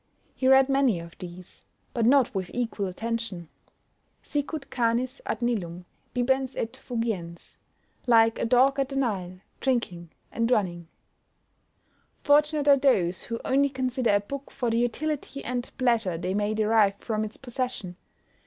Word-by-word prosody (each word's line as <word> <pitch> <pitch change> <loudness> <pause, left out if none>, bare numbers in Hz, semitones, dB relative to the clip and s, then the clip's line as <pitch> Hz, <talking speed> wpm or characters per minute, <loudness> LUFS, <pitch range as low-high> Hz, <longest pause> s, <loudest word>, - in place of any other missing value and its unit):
He 260 - -1
read 265 0 +7
many 270 -8 +2
of 170 0 -10
these, 180 0 -11 0.3
but 230 -2 +1
not 265 -1 +4
with 190 -3 -3
equal 225 -5 -1
attention 215 -3 -4 0.7
"Sicut 290 0 -4
canis 245 +2 0
ad - - -2
Nilum, 180 -7 -2 0.3
bibens 265 +1 0
et 225 - -2
fugiens;" 225 -10 -4 0.5
like 225 -1 +5
a - - 0
dog 260 +4 +4
at 270 -1 0
the 275 - -6
Nile, 190 -8 -2 0.2
drinking 190 -10 -1 0.2
and 230 0 0
running. 175 -8 0 1.3
Fortunate 295 0 +3
are 280 -1 +7
those 190 -11 +2
who 230 0 -4
only 280 +2 +3
consider 255 -4 0
a - - +4
book 275 +7 -7
for 245 -4 -2
the 230 - +2
utility 275 +3 -2
and 245 0 -3
pleasure 230 -9 +1
they 180 +2 -2
may 210 +1 0
derive 215 -2 +3
from 215 +1 -2
its 215 0 -6
possession. 245 -8 -4
235 Hz, 145 wpm, -26 LUFS, 200-265 Hz, 1.3 s, read